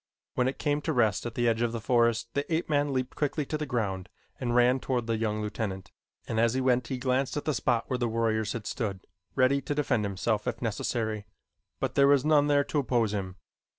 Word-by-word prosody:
When 125 - +1
it 130 - -2
came 145 -1 0
to 160 - -1
rest 115 -4 +2
at 115 - -7
the 120 -1 +1
edge 115 0 +2
of 120 -1 0
the 115 - -2
forest 115 0 +2
the 140 +3 -2
ape 165 +2 0
man 145 -1 +1
leaped 130 -1 -2
quickly 150 0 -1
to 155 - -3
the 150 -1 -3
ground 95 -7 -2 0.3
and 120 -2 -1
ran 125 +2 +4
toward 125 -2 -1
the 115 0 0
young 110 -1 -1
lieutenant, 100 -3 -4 0.4
and 110 - -1
as 115 +1 +3
he - - +1
went 125 -2 +2
he 130 - -3
glanced 130 +2 0
at 145 - -3
the 155 - +1
spot 120 -4 0
where 125 -2 -1
the 120 -2 0
warriors 110 -1 0
had 115 -3 -5
stood, 100 -6 -3 0.3
ready 135 +1 +3
to 145 - -3
defend 140 -7 +1
himself 105 +2 -1
if - - -2
necessary, 110 -2 -2 0.5
but - - -1
there 140 0 +5
was 140 -1 +4
none 150 -2 +4
there 145 -1 +4
to 150 - -1
oppose 120 -6 +1
him. 95 -3 -3
120 Hz, 230 wpm, -28 LUFS, 110-140 Hz, 0.5 s, there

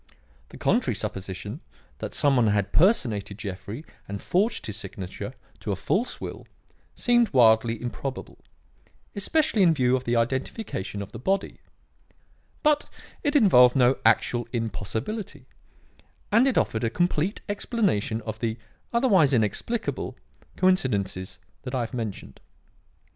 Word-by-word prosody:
The - - -12
contrary - - +1
supposition 95 - -5 0.4
that - - -5
some 145 -2 +3
one 120 -3 +4
had 100 -1 +1
personated 120 - +2
Jeffrey 100 - -6 0.2
and 100 0 -5
forged 205 - 0
his 105 - -5
signature 95 -4 -7 0.2
to - - -3
a - - 0
false 200 - -1
will - - -7 0.5
seemed 240 -2 +3
wildly 115 -2 +4
improbable, 130 +2 -6 0.8
especially 220 +2 +2
in 170 -4 +5
view 125 -2 +3
of 130 - -3
the 120 - +1
identification 115 - -2
of 100 - -11
the 115 - -8
body; 195 +10 -1 1.0
but 300 -1 +2 0.3
it 290 -1 0
involved 125 - +6
no 130 0 +4
actual 120 +1 +2
impossibility; 120 - -4 0.9
and 230 +5 +5
it 265 - +1
offered 110 - +1
a 115 - +2
complete 175 - 0
explanation 200 - 0
of 110 0 -6
the, 115 -1 -2 0.3
otherwise 195 - +4
inexplicable, 125 - -1 0.4
coincidences 100 - 0 0.2
that 125 +1 -5
I 125 - 0
have 115 - -4
mentioned. 115 -5 -5
125 Hz, 130 wpm, -26 LUFS, -, 1.0 s, involved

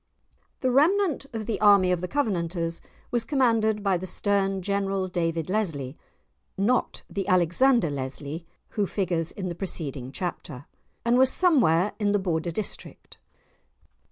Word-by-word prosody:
The 255 - +1
remnant 315 +2 +2
of 225 -2 -4
the 225 - -3
army 200 -3 +6
of 180 -1 0
the 180 - -3
Covenanters 170 - -1 0.3
was 240 -2 0
commanded 225 -6 +1
by 195 -2 +2
the 185 +2 -6
stern 195 0 0
General 195 -1 -1
David 165 -3 -1
Lesly 160 -10 -2 0.6
(not 230 +6 0
the 195 -2 -4
Alexander 185 - +3
Leslie 140 +4 -5 0.2
who 205 -3 -1
figures 175 -5 -1
in 190 -2 -5
the 175 - -3
preceding 145 -8 -3
chapter), 155 -4 -5 0.4
and 240 +1 +4
was 260 0 +5
somewhere 210 - +3
in 205 -1 +1
the - - +4
Border 175 -3 -1
district. 200 +5 -6
195 Hz, 140 wpm, -26 LUFS, 170-220 Hz, 0.6 s, army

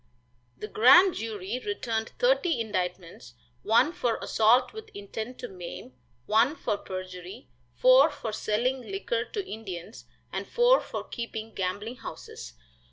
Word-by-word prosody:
The 210 - -6
grand 345 - +7
jury 220 +1 -4
returned 230 - -3
thirty - - +2
indictments, 180 - -4 0.3
one 240 +9 +3
for 245 -10 0
assault 240 +4 +3
with 440 0 -9
intent 220 +4 -6
to 245 - -4
maim, 175 - -9 0.3
one 230 +8 +3
for 210 - -1
perjury, 185 -5 -8 0.3
four 255 - +6
for 265 -7 -5
selling 240 +5 0
liquor 395 - -2
to 405 -3 -5
Indians, 205 -2 -8 0.3
and - - -3
four 485 +1 +4
for - - -5
keeping 225 -2 -6
gambling 205 +6 -3
houses. 65 - -9
225 Hz, 130 wpm, -28 LUFS, 195-265 Hz, 0.3 s, grand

